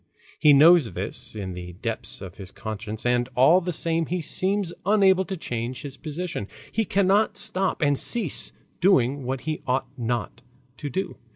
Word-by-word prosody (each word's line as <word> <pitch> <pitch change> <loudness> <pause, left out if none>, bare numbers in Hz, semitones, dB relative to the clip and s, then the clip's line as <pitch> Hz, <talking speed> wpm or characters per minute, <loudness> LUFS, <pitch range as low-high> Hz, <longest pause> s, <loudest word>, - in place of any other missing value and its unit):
He 150 - +6
knows 150 -2 +6
this 110 +5 -6
in 95 -3 -5
the 90 0 -8
depths 115 +5 -4
of 95 -3 -9
his 95 -2 -9
conscience, 110 +1 -6
and 120 0 +1
all 155 +9 +6
the 180 0 -2
same 165 0 0
he 180 +2 -1
seems 185 +3 0
unable 190 -2 +4
to 190 - -5
change 120 -3 -4
his 140 -2 -6
position; 155 - -5 0.2
he 225 0 0
cannot 200 +2 +2
stop 185 -3 0
and 145 -1 +3
cease 205 - -1 0.3
doing 140 -7 +3
what 130 +1 -2
he 155 0 -3
ought 130 +1 +1
not 120 0 -3 0.4
to 145 - -5
do. 190 +9 -3
145 Hz, 170 wpm, -25 LUFS, 120-180 Hz, 0.4 s, He